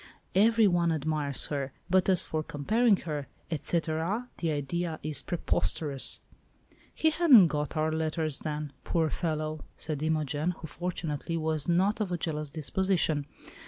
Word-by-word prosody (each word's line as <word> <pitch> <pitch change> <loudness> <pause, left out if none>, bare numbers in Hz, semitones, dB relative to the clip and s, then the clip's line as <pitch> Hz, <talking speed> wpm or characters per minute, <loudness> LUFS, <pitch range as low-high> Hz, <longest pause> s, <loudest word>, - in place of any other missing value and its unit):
Every 225 +3 +5
one 175 -3 +3
admires 150 -3 -1
her, 135 -2 -2
but 185 +1 +3
as 185 -2 +4
for 155 - -2
comparing 210 +10 +2
her, 150 -4 -3 0.2
et 155 -3 -3
cetera, 170 +8 -1
the 165 - 0
idea 155 +3 -2
is 150 -3 +2
preposterous." 135 - 0 0.7
"He 315 - +3
hadn't 280 - +7
got 150 +1 -2
our 155 0 +1
letters 155 -1 -1
then, 150 -2 -4
poor 160 -3 0
fellow!" 155 -2 -2
said 155 -2 -3
Imogen, 155 +1 0
who, - - -8
fortunately, 165 -1 -3
was 160 -1 -1
not 195 +6 +2
of 200 -4 -1
a 175 - 0
jealous 155 -3 -3
disposition. 155 0 0
160 Hz, 145 wpm, -29 LUFS, 150-175 Hz, 0.7 s, hadn't